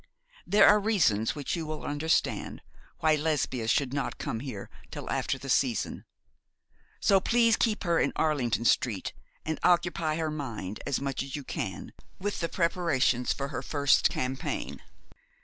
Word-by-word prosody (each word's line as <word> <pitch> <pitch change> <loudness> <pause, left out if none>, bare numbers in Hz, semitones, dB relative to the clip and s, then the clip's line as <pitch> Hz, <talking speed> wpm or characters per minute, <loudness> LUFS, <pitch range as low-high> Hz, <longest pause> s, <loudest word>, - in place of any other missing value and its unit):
There 210 - +6
are 210 - +7
reasons, 155 - +2
which 145 +3 -2
you 165 -2 -4
will 155 0 -5
understand, 150 +2 -1 0.4
why 155 -1 +4
Lesbia 145 -6 0
should 130 +3 +1
not 140 -1 -2
come 110 - -3
here 115 -6 -6 0.2
till - - -7
after - - -1
the 135 - -9
season; 125 -3 0 0.9
so 195 - +4
please 230 +3 +3
keep 220 -2 0
her 170 -3 +2
in - - +2
Arlington 125 -7 0
Street, 110 -5 +1 0.3
and 160 0 -2
occupy 170 -3 +2
her 160 -1 -1
mind 115 -9 -5
as 135 - 0
much 135 -1 -2
as 135 0 -5
you 145 - -5
can - - -5 0.2
with 205 +2 -3
the 165 - -1
preparations 165 -8 +1
for 140 0 -2
her - - -4
first 145 -2 +3
campaign. 130 +1 -3
145 Hz, 155 wpm, -28 LUFS, 130-170 Hz, 0.9 s, are